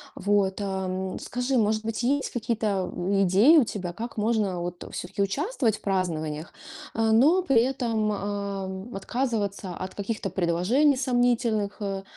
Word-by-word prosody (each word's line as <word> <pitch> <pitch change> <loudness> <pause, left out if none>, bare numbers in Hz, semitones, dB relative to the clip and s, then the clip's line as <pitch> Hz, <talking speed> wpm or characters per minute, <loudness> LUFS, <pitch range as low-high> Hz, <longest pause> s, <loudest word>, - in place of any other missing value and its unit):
Вот, 200 0 +1
ам, 190 -1 -3
скажи, 250 +1 -1
может 215 0 +1
быть, 225 +1 -2
есть 275 +2 +1
какие-то 220 -5 -1 0.3
идеи 200 - +6
у 285 - +7
тебя, 185 -5 -5
как 230 +3 -6
можно 210 -4 +1
вот 175 0 -5
всё-таки 180 +3 -4
участвовать 240 - 0
в - - -21
празднованиях, 165 -5 -2 0.4
э, - - -4
но 305 +12 +5
при 270 -9 +4
этом, 235 -4 0
ам, 200 0 -4
отказываться 205 -4 -2
от 185 0 -6
каких-то 200 -1 -3
предложений 170 -1 -1 0.3
сомнительных, 245 -5 +1
э, 195 -1 -2
205 Hz, 140 wpm, -26 LUFS, 190-235 Hz, 0.4 s, у